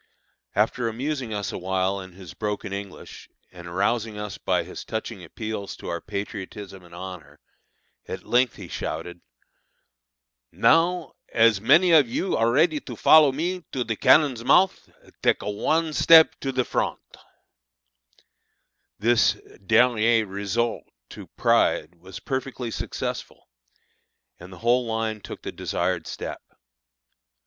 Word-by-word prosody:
After 115 +3 +1
amusing 130 +1 -3
us 105 -2 -3
awhile 95 +1 -1
in 95 -1 -11
his 90 -2 -11
broken 105 -1 -4
English, 100 -1 -9 0.2
and 85 -1 -11
arousing 105 +4 -1
us 105 -1 -6
by - - 0
his - - -9
touching 110 -3 -5
appeals 110 +3 -6
to - - -8
our 85 - -3
patriotism 100 -1 -7
and 85 -1 -14
honor, 90 -3 -9 0.7
at - - -6
length 125 -1 +2
he - - -9
shouted, 90 0 -5 1.3
"Now 170 +1 +2 0.2
as 115 -3 +4
many 155 - +5
of 150 -7 +6
you 185 +10 -2
as - - 0
are 115 +1 +3
ready 155 +4 +3
to - - -9
follow 155 -3 +6
me 175 +6 -3
to 130 - -1
the 115 -2 -3
cannon's 130 -1 +4
month, 190 +9 +3 0.3
take - - +2
one 155 +10 0
step 160 +1 +7
to 135 - -3
the 130 -1 0
front." - - -1 2.0
This 120 +3 +3 0.3
dernier 115 +1 +3
resort 100 +4 -2 0.3
to - - -10
pride 80 +4 +2
was 90 +2 -11
perfectly 130 -3 -4
successful, - - -5 0.9
and 90 +2 -12
the 95 - -11
whole 120 0 +3
line 110 -1 -2
took - - -9
the - - -5
desired - - -2
step. - - -6
110 Hz, 135 wpm, -24 LUFS, 100-130 Hz, 2.0 s, step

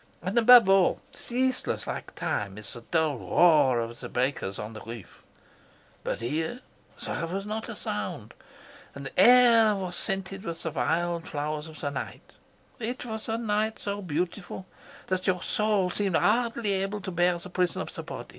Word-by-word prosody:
And 185 +2 -3
above 240 -2 +8
all, 195 -2 +4
ceaseless 255 +1 -1
like - - -6
time, 100 -1 -2
is 105 -2 -6
the 120 - -8
dull 155 0 0
roar 150 -8 +4
of 115 0 -4
the - - -7
breakers 125 -6 -1
on 105 +1 -6
the 110 - -9
reef. 115 -5 -10 0.8
But - - -3
here 160 - -2 0.4
there 165 - -3
was 195 +4 -4
not 220 +1 -4
a - - -5
sound, - - -4 0.6
and - - -8
the - - -4
air 235 -3 +7
was 185 -2 -4
scented 195 +1 -3
with 165 -5 -5
the 160 - -2
white 170 +3 0
flowers 150 +1 -3
of 155 -1 -11
the 145 - -2
night. - - -7 0.5
It 245 +2 -3
was 220 -1 -4
a 225 - 0
night 220 -1 0
so 200 0 -4
beautiful 180 +2 -3 0.4
that 185 0 -2
your 180 -2 +1
soul 210 -4 +1
seemed 195 -4 +1
hardly 230 -1 +2
able 195 +2 -1
to 190 - -5
bear 175 0 +2
the 180 +1 -10
prison 180 -1 0
of - - -8
the - - -5
body. - - -8
185 Hz, 175 wpm, -27 LUFS, 155-215 Hz, 0.8 s, above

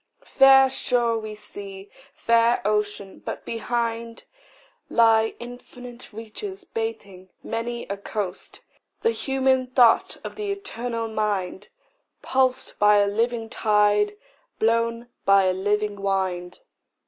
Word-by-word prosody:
Fair 270 0 +6
shore 240 -3 +1
we 215 -1 -7
see, 200 -2 -9 0.2
fair 230 +1 +2
ocean; 210 -2 -2
but - - -6
behind 230 0 -3 0.7
Lie 225 -1 +4
infinite 245 0 -11
reaches 230 - -8
bathing 225 - -6
many 235 +1 -4
a 200 - -5
coast 200 -2 -5 0.4
The 460 - +3
human 265 - +1
thought 250 -2 +4
of - - -8
the 415 -1 -3
eternal 240 - -4
mind, 210 -4 -2 0.5
Pulsed 260 -1 0
by 210 0 +6
a 205 - +4
living 225 +3 -1
tide, 210 -1 +2 0.4
blown 230 +1 0 0.2
by 195 0 +5
a 185 0 +2
living 205 +1 -1
wind. 185 -2 -2
225 Hz, 110 wpm, -24 LUFS, 205-240 Hz, 0.7 s, Fair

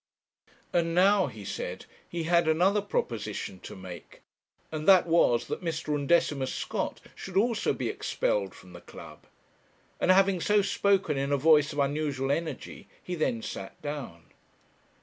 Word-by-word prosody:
'And 165 -1 +1
now,' 195 0 +4
he 110 -6 -9
said, 95 -2 -5 0.2
'he 170 -1 -3
had 170 0 +3
another 185 +6 +3
proposition 105 - -3
to - - -10
make; 90 -3 -11 0.5
and 155 -1 -4
that 190 -3 +7
was 165 -8 +3
that - - -5
Mr. 160 -2 -2
Undecimus 145 -2 +1
Scott - - -3
should 190 -1 -6
also 225 +1 +2
be - - -3
expelled - - -1
from - - -15
the - - -11
club,' - - -13 0.7
and - - 0
having 190 -1 +4
so 205 +2 +3
spoken, 195 -6 +1
in 140 +1 -1
a 140 - +3
voice 150 +1 +4
of 145 - -8
unusual 140 -1 0
energy, 155 -2 -4 0.2
he 180 - -5
then 120 -9 -1
sat 95 - -7
down. 145 - -6
155 Hz, 150 wpm, -28 LUFS, 135-185 Hz, 0.7 s, that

